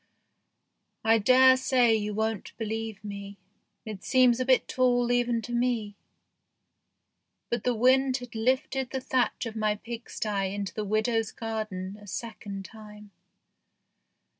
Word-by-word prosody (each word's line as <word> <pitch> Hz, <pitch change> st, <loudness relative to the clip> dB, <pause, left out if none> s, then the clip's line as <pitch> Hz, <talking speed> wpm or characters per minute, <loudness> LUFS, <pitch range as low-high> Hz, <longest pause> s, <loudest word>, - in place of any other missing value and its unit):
I 225 Hz, 0 st, +4 dB
dare 260 Hz, +4 st, +6 dB
say 250 Hz, -3 st, +3 dB
you 210 Hz, -1 st, -2 dB
won't 220 Hz, -1 st, -3 dB
believe 220 Hz, -2 st, -4 dB
me, 200 Hz, -1 st, -7 dB, 0.5 s
it 215 Hz, -4 st, -7 dB
seems 255 Hz, -2 st, +4 dB
a 255 Hz, -, 0 dB
bit 260 Hz, -1 st, +3 dB
tall 245 Hz, -1 st, +2 dB
even 240 Hz, -1 st, +1 dB
to 240 Hz, -, -7 dB
me, 235 Hz, -4 st, 0 dB, 1.6 s
but 235 Hz, -3 st, -1 dB
the 250 Hz, -1 st, +1 dB
wind 260 Hz, +3 st, +3 dB
had 245 Hz, -2 st, -10 dB
lifted 260 Hz, +3 st, 0 dB
the 265 Hz, -, -3 dB
thatch 255 Hz, -1 st, 0 dB
of 225 Hz, -1 st, -6 dB
my 215 Hz, -1 st, +1 dB
pigsty 210 Hz, -3 st, -4 dB
into 200 Hz, -1 st, -4 dB
the 215 Hz, -, -3 dB
widow's 220 Hz, +2 st, 0 dB
garden 215 Hz, -3 st, -5 dB
a 205 Hz, -, -13 dB
second 200 Hz, -1 st, -6 dB
time. 210 Hz, -1 st, -13 dB
225 Hz, 135 wpm, -28 LUFS, 210-245 Hz, 1.6 s, dare